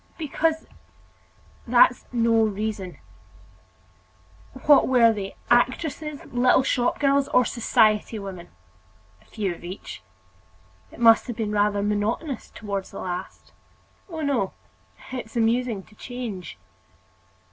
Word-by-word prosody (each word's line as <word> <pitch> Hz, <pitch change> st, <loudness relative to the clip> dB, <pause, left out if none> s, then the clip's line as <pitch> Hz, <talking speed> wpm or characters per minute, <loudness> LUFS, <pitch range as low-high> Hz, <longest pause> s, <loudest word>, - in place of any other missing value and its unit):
"Because——" 320 Hz, +1 st, -1 dB, 1.0 s
"That's -, -, +4 dB
no 230 Hz, -2 st, +3 dB
reason!" 210 Hz, -3 st, -3 dB, 1.7 s
"What 290 Hz, -2 st, +6 dB
were 235 Hz, -3 st, +5 dB
they 195 Hz, -2 st, -6 dB, 0.2 s
actresses, 285 Hz, +4 st, 0 dB
little 250 Hz, +1 st, +3 dB
shop 245 Hz, -2 st, 0 dB
girls, 280 Hz, -1 st, +2 dB
or 250 Hz, -, +3 dB
society 220 Hz, -2 st, +2 dB
women?" 190 Hz, -4 st, -8 dB, 0.7 s
"A -, -, -25 dB
few 200 Hz, -5 st, -3 dB
of 170 Hz, -, -14 dB
each." 180 Hz, +3 st, -8 dB, 0.9 s
"It -, -, -14 dB
must 230 Hz, 0 st, +5 dB
have 240 Hz, -, -4 dB
been 220 Hz, -2 st, -2 dB
rather 205 Hz, -1 st, +1 dB
monotonous 215 Hz, +7 st, -2 dB
toward 200 Hz, -2 st, -5 dB
the 195 Hz, -, -11 dB
last." 180 Hz, +1 st, -6 dB, 0.6 s
"Oh, 325 Hz, -2 st, -5 dB
no; 265 Hz, -10 st, 0 dB, 0.6 s
it's 250 Hz, -3 st, -7 dB
amusing 230 Hz, -2 st, +1 dB
to 210 Hz, -, -21 dB
change." 210 Hz, -, -7 dB
225 Hz, 115 wpm, -24 LUFS, 205-255 Hz, 1.7 s, What